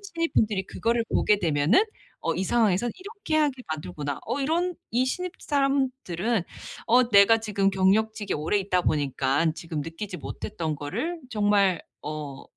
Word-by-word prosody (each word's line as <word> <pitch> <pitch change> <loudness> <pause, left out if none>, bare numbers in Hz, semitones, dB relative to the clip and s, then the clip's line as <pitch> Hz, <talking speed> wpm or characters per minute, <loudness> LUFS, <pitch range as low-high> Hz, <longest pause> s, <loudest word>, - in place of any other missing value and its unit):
신입분들이 330 - 0
그거를 230 +1 0
보게 210 -1 +2
되면은 160 - +3 0.4
‘어 - - +1
이 190 - -1
상황에서 215 0 +2
이렇게 400 -3 -6
하게 285 -4 +1
만들구나.‘ 150 -3 -4
어 280 - -2
이런 340 +5 0 0.2
이 245 +2 +3
신입 360 +7 -3
사람들은 260 - 0 0.4
어 245 +1 +4
내가 205 +1 +6
지금 205 -3 0
경력직에 205 +3 +1
오래 160 +7 0
있다 185 -2 0
보니까는 145 +1 +1
지금 165 -2 -5
느끼지 170 +5 -6
못했던 160 -7 -4
거를 300 - -3
정말 205 -4 +2 0.2
어 150 -2 -6
205 Hz, 325 characters per minute, -26 LUFS, 165-255 Hz, 0.4 s, 내가